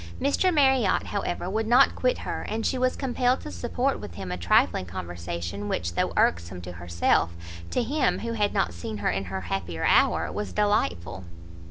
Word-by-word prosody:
Mr 285 Hz, +7 st, +2 dB
Marriot, 265 Hz, -, +3 dB
however, 180 Hz, -3 st, -3 dB
would 220 Hz, +3 st, -1 dB
not 245 Hz, +4 st, +6 dB
quit -, -, +1 dB
her, -, -, -4 dB
and 225 Hz, +1 st, -2 dB
she -, -, +1 dB
was 255 Hz, 0 st, +1 dB
compelled 255 Hz, -1 st, +1 dB
to -, -, -7 dB
support 250 Hz, +3 st, -1 dB
with 85 Hz, -, -9 dB
him 95 Hz, -1 st, -6 dB
a -, -, -1 dB
trifling 90 Hz, +1 st, +2 dB
conversation, 85 Hz, +2 st, -5 dB
which, 85 Hz, 0 st, -2 dB
though -, -, 0 dB
irksome 85 Hz, +1 st, +1 dB
to 90 Hz, 0 st, -8 dB
herself, 85 Hz, -1 st, +1 dB, 0.3 s
to 250 Hz, -, 0 dB
him, 275 Hz, +3 st, +1 dB
who 230 Hz, 0 st, -4 dB
had 210 Hz, -2 st, +1 dB
not 85 Hz, -, 0 dB
seen 85 Hz, +5 st, -6 dB
her 100 Hz, -, 0 dB
in 95 Hz, 0 st, -2 dB
her 95 Hz, +1 st, -4 dB
happier 85 Hz, -2 st, -3 dB
hour, -, -, +3 dB
was 210 Hz, -, -4 dB
delightful. 95 Hz, -, 0 dB
100 Hz, 185 wpm, -26 LUFS, -, 0.3 s, not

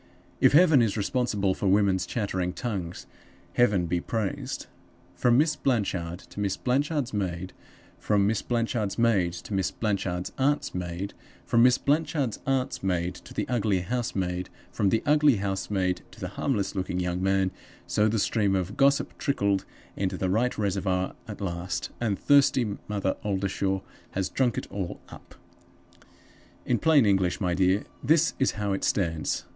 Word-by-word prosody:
If -, -, +5 dB
Heaven 155 Hz, -4 st, +6 dB
is 110 Hz, -2 st, +1 dB
responsible 105 Hz, -4 st, 0 dB
for 100 Hz, -, -2 dB
women's 95 Hz, -2 st, +3 dB
chattering 95 Hz, -5 st, -2 dB
tongues, 95 Hz, -9 st, -4 dB, 0.5 s
Heaven 105 Hz, -7 st, +3 dB
be 85 Hz, +1 st, -1 dB
praised! 110 Hz, -2 st, -3 dB, 0.5 s
From 120 Hz, +6 st, +3 dB
Miss 155 Hz, +2 st, +3 dB
Blanchard 95 Hz, -, -1 dB
to -, -, -8 dB
Miss 100 Hz, -1 st, -1 dB
Blanchard's 140 Hz, 0 st, 0 dB
maid; 95 Hz, -3 st, -3 dB, 0.5 s
from 100 Hz, -2 st, +2 dB
Miss 105 Hz, +1 st, +1 dB
Blanchard's 115 Hz, -4 st, -1 dB
maid 105 Hz, -7 st, +2 dB
to 90 Hz, +4 st, -7 dB
Miss 95 Hz, -1 st, +1 dB
Blanchard's 95 Hz, -4 st, -2 dB
aunt's 145 Hz, +2 st, +1 dB
maid; 90 Hz, +2 st, -4 dB, 0.3 s
from 115 Hz, -, +3 dB
Miss 125 Hz, +1 st, +6 dB
Blanchard's 145 Hz, -5 st, 0 dB
aunt's 135 Hz, -1 st, 0 dB
maid, 90 Hz, -2 st, 0 dB
to -, -, -14 dB
the -, -, -3 dB
ugly 105 Hz, -6 st, +1 dB
housemaid; 95 Hz, -5 st, -2 dB, 0.2 s
from 100 Hz, -, +1 dB
the 110 Hz, -, +1 dB
ugly 150 Hz, -2 st, +5 dB
housemaid 95 Hz, -2 st, -1 dB
to -, -, -16 dB
the -, -, -4 dB
harmless 100 Hz, -1 st, -1 dB
looking 90 Hz, -2 st, -2 dB
young 90 Hz, 0 st, -1 dB
man 95 Hz, 0 st, +2 dB, 0.3 s
so 105 Hz, -, +2 dB
the 110 Hz, +1 st, +1 dB
stream 100 Hz, -1 st, +1 dB
of 95 Hz, +3 st, -2 dB
gossip 140 Hz, 0 st, +3 dB
trickled 100 Hz, -8 st, +1 dB, 0.3 s
into 95 Hz, -1 st, -2 dB
the 95 Hz, 0 st, -1 dB
right 120 Hz, +5 st, +1 dB
reservoir 95 Hz, -2 st, 0 dB
at 105 Hz, -1 st, -8 dB
last, 90 Hz, -1 st, -3 dB
and 105 Hz, -5 st, 0 dB
thirsty 130 Hz, -6 st, +3 dB
Mother 100 Hz, -2 st, -1 dB
Oldershaw 95 Hz, -1 st, -1 dB, 0.3 s
has 95 Hz, 0 st, -1 dB
drunk 125 Hz, -4 st, +1 dB
it -, -, -2 dB
all 95 Hz, -3 st, -4 dB
up. -, -, -13 dB, 1.3 s
"In 120 Hz, -, +1 dB
plain 155 Hz, -6 st, +5 dB
English, 95 Hz, -3 st, +2 dB
my 90 Hz, -3 st, 0 dB
dear, 95 Hz, +3 st, +2 dB, 0.2 s
this 160 Hz, +5 st, +3 dB
is 135 Hz, -, +2 dB
how 100 Hz, -1 st, -1 dB
it 95 Hz, -, -3 dB
stands. 80 Hz, -5 st, 0 dB
100 Hz, 155 wpm, -27 LUFS, 95-120 Hz, 1.3 s, Heaven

